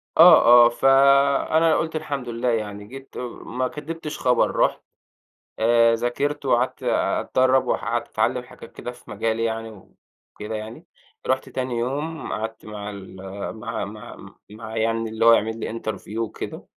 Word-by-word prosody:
آه، 120 0 +8
آه 120 - +5
فأنا 140 +5 +4
قُلت 160 0 -2
الحمد 140 -5 -4
لله 120 +1 -1
يعني، 105 -3 -3
جيت 135 +2 -11
آآ - - -4 0.2
ما 130 +2 -2
كدّبتش 155 +1 -7
خبر، 125 -1 +2
رُحت، - - +1 0.8
آآ 115 0 +4
ذاكرت، 140 +5 -2
وقعدت 125 0 0
آآ - - +1
أتدرب، 130 +1 +2
وح - - -1
قعدت - - -2
أتعلم - - 0
حاجات - - -14
كده 120 - -6
في 125 - -15
مجالي 110 +2 -1
يعني 115 0 -2 0.7
وكده 105 +1 -6
يعني، 110 +2 -8 0.4
رُحت 130 0 0
تاني 130 -2 -3
يوم 145 +7 -3
قعدت 110 0 -5
مع 105 -1 -7
ال 100 -2 -10 0.4
مع - - -4
مع - - -11 0.2
مع 110 +1 -9
يعني 115 0 0
اللي 110 +1 -1
هو 115 - +9
هيعمل 110 0 +2
لي 115 +1 -4
interview 110 0 -6
وكده، 115 -1 -5
120 Hz, 155 wpm, -23 LUFS, 110-135 Hz, 0.8 s, هو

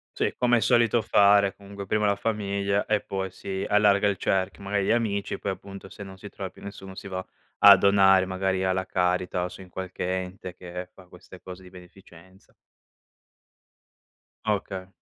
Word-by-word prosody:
Sì, - - 0
come 120 -1 +3
è - - +2
solito 120 -2 +3
fare, 100 -1 +4
comunque 100 0 -9
prima 105 +1 +1
la 100 - +2
famiglia 100 -2 -1
e 105 -1 +1
poi 95 -1 -4
si 95 +1 -5
allarga 105 -1 +4
il 100 -2 0
cerchio, 95 +2 -1
magari 100 0 -1
gli - - +1
amici, 110 -4 -1
poi 100 - -3
appunto 95 0 -9
se - - -12
non 95 -1 -9
si 100 - -10
trova 95 -1 -6
più - - -17
nessuno 95 -1 -9
si 100 - -9
va 95 -1 -4 0.4
a 100 -1 +10
donare 95 -1 +5
magari 95 0 -1
alla 95 0 0
Caritas 90 0 0
o 90 - -3
su 90 +2 -11
in 95 - -13
qualche 90 0 -5
ente 90 0 -9
che 90 0 -8
fa 95 - -17
queste 90 +1 -15
cose 90 0 -10
di 90 - -14
beneficenza. 90 0 -17 1.9
Okay. 95 -3 -2
95 Hz, 180 wpm, -26 LUFS, 95-100 Hz, 1.9 s, a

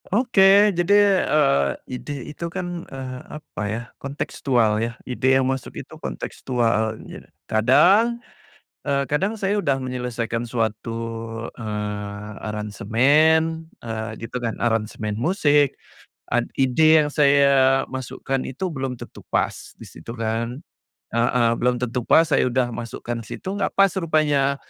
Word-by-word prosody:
Oke, 205 -2 +5
jadi, 200 +2 +4
eee, 70 - +3 0.3
ide 125 - -6 0.2
itu 170 - -6
kan, 175 -1 -5
eee, 130 -1 -6 0.2
apa 150 -7 -9
ya, 110 +3 -3 0.2
kontekstual 125 -5 0
ya. 115 0 -3
Ide 130 +1 +2
yang 135 - +1
masuk 130 0 -3
itu - - -9
kontekstual 110 - -1
ja - - -10 0.2
kadang, 185 - +4 0.7
eh, 140 -2 0
kadang 195 +10 -1
saya 195 +1 +1
sudah 140 -10 0
menyelesaikan 125 -2 -3
suatu, 115 -2 -2 0.6
eee, 105 -1 -5
aransemen, 145 +10 +2
eee, 110 -1 -5
gitu 115 +2 -6
kan, 115 - 0
aransemen 110 -2 -1
musik 145 - +2 0.6
ad - - +1 0.2
ide 155 +5 +5
yang - - -2
saya 140 -2 +4
masukkan 130 +1 -4
itu 160 +9 -4
belum 135 -5 -4
tentu - - -11
pas - - +1 0.2
di - - -9
situ 80 +8 -10
kan 115 +3 -2 0.5
heeh, 115 +1 +2
belum 125 0 +2
tentu 125 0 -1
pas. 165 - +6
Saya 145 - +3
udah 125 0 0
masukkan 115 0 -5
situ, 185 - -7
nggak - - -1
pas 195 0 +5
rupanya. 150 -4 +2
130 Hz, 130 wpm, -22 LUFS, 115-155 Hz, 0.7 s, pas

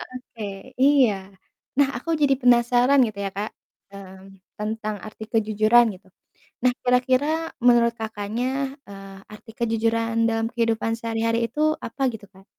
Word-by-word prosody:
Oke, 245 -3 -9 0.4
iya. 270 -6 +5 0.7
Nah, 285 - +5
aku 245 +7 -6
jadi 275 -2 +4
penasaran 245 +2 +4
gitu 210 -2 -8
ya, 195 - -2
Kak, 205 +2 -4 0.4
mmm, 195 0 -12 0.2
tentang 215 0 -3
arti 220 0 -10
kejujuran 220 +1 +4
gitu. 190 - -20 0.6
Nah, 250 - +4
kira-kira 255 +2 +2 0.4
menurut 235 -1 +5
Kakaknya, 220 +2 -4 0.4
eee, 195 -1 -11 0.2
arti 225 - -14
kejujuran 230 0 0 0.2
dalam 225 0 0
kehidupan 230 -1 -1
sehari-hari 230 0 -1
itu 305 +4 +1
apa 270 +4 -6
gitu, 210 -2 -10
Kak? 190 +1 -20
230 Hz, 135 wpm, -23 LUFS, 215-245 Hz, 0.7 s, iya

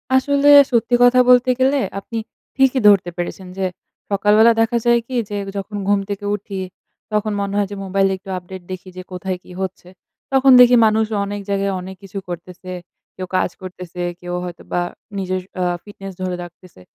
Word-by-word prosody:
আসলে 280 +2 +3 0.2
সত্যি 240 0 +2
কথা 245 +1 +6
বলতে 250 0 +6
গেলে 270 +2 +3 0.2
আপনি 230 +3 -7 0.4
ঠিকই 270 -1 +3
ধরতে 195 -4 +5
পেরেছেন। 180 +2 -5
যে 190 - 0 0.5
সকালবেলা 210 +3 +5
দেখা 225 +1 +2
যায় 235 0 +5
কি? 260 - -5
যে, 205 - -3 0.2
যখন 200 +1 -5
ঘুম 205 0 +3
থেকে 200 0 -4
উঠি 200 -1 -7 0.5
তখন 210 0 0
মনে 200 0 -3
হয় 205 -1 +1
যে - - -5
মোবাইলে 195 0 +1
একটু 195 +1 -14
আপডেট 185 +1 -9
দেখি 185 0 -7
যে 185 - -6
কোথায় 185 0 -4
কি - - -15
হচ্ছে? 190 -1 -5 0.4
তখন 270 0 +5
দেখি 245 0 +7
মানুষ 220 0 +3 0.2
অনেক 205 0 -5
জায়গায়, 200 0 0
অনেক 190 +1 -8
কিছু 195 +1 -9
করতেছে। 180 +1 -8 0.4
কেউ 185 0 -6
কাজ - - +1
করতেছে, 180 -1 -8 0.2
কেউ 175 0 -6
হয়তোবা 175 0 -4 0.4
নিজের 185 -1 -2 0.2
আ - - +2 0.2
ফিটনেস 195 -2 -9
ধরে 185 -1 -2
রাখতেছে। 175 - -15
195 Hz, 175 wpm, -19 LUFS, 185-225 Hz, 0.5 s, দেখি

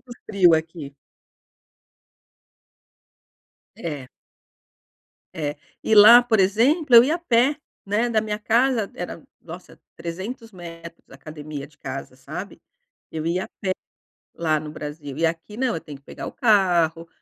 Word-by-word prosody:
Muito 255 - -21 0.2
frio 185 -5 +5
aqui. 160 -3 -4 2.8
É. 145 -6 -6 1.3
É. 145 -1 -3 0.3
E 220 - +2
lá, 220 +4 +9
por 235 -3 +1
exemplo, 245 - +3
eu 235 - +11
ia 300 +6 +1
a - - -3
pé, 270 -2 +2 0.3
né, 215 +4 +1
da 220 -2 +2
minha 210 -1 -3
casa 230 0 +1
era, - - -7 0.2
nossa, - - -12 0.2
300 210 +7 -7
metros, 170 -2 -11
a - - -13
academia 150 -2 -8
de 150 - -25
casa, 130 -1 -7
sabe? 155 +9 -8 0.5
Eu 160 -1 -5
ia 180 +3 0
a - - -12
pé, 190 - -2 0.7
lá 160 -2 +1
no 150 0 -8
Brasil. 150 -2 -8
E 165 - +2
aqui 165 +6 -4
não, 255 -1 0
eu 160 - -5
tenho 145 -2 -10
que 140 - -28
pegar - - -8
o - - -6
carro, 175 - +2
180 Hz, 145 wpm, -23 LUFS, 155-225 Hz, 2.8 s, eu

